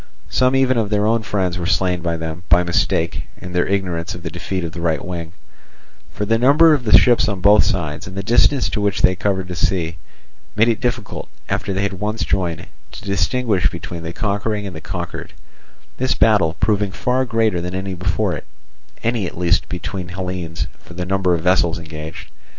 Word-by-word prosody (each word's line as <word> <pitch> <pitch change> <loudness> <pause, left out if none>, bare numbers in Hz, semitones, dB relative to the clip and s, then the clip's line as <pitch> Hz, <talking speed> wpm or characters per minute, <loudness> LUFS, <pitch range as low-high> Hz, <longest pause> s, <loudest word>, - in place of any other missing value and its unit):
Some 130 +1 +3
even 130 -2 +3
of 105 -3 -1
their 105 0 +1
own 115 +1 +2
friends 95 -4 -1
were 85 - -2
slain 90 -2 +1
by 85 -1 -1
them, 80 +1 -5
by 85 +1 +5
mistake, 85 -1 0
in 90 - -8
their 90 0 +1
ignorance 90 -3 -1
of 85 - -10
the 85 - -4
defeat 90 +2 -3
of 85 - -4
the 85 - -7
right 80 -2 0
wing 85 -2 -5 0.8
For 105 - -3
the 115 +2 +2
number 150 +6 +6
of 135 -5 0
the 105 - +8
ships 120 -2 +4
on 100 -3 -2
both 100 +3 +6
sides, 80 -8 -2
and 95 +1 -8
the 95 - -2
distance 120 +6 +3
to 105 - -2
which 100 -2 0
they 95 - +5
covered 95 0 -1
the 90 - -5
sea, 85 -2 0 0.6
made 115 +3 +4
it 115 - 0
difficult, 120 -4 -3 0.2
after 100 - -1
they 95 +1 0
had 100 0 -1
once 105 +2 -2
joined, 85 -4 -1 0.3
to - - -8
distinguish 100 0 +1
between 85 0 -7
the 80 0 -5
conquering 105 +2 -1
and 95 -4 -6
the 80 - -7
conquered; - - -6 0.6
this 130 +1 +1
battle 95 -8 +3
proving 105 -2 +1
far 125 +6 0
greater 110 -7 +1
than 90 +1 -4
any 95 0 -3
before 90 +1 0
it, - - -6 0.6
any 115 -4 0
at - - -9
least 90 +1 +2
between 90 0 -4
Hellenes, 90 -2 -4
for 85 - -14
the 90 0 -3
number 95 -1 +2
of 85 - -3
vessels 90 -1 +2
engaged. 80 +1 -8
95 Hz, 200 wpm, -20 LUFS, 85-105 Hz, 0.8 s, the